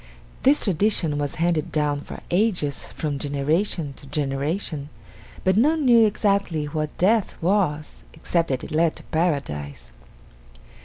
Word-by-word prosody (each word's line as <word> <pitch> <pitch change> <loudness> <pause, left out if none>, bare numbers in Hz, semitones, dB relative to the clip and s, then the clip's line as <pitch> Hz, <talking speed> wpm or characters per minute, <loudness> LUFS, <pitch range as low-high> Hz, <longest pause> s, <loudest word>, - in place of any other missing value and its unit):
This 275 +3 +4
tradition 180 -6 +1
was 145 -1 -2
handed 165 -2 0
down 145 -2 0
for - - -9
ages 175 -7 0
from 145 -3 -4
generation 145 +3 -1
to 140 - -13
generation 145 +2 -2 0.5
but 185 0 +3
none 300 +5 +3
knew 235 -3 +6
exactly 200 -7 0
what 155 0 -4
death 205 +2 +2
was 165 -5 0
except 165 +1 -1
that 130 -2 -2
it - - -8
led 160 +1 +2
to - - -11
Paradise. 75 - -2
160 Hz, 135 wpm, -23 LUFS, 145-195 Hz, 0.5 s, knew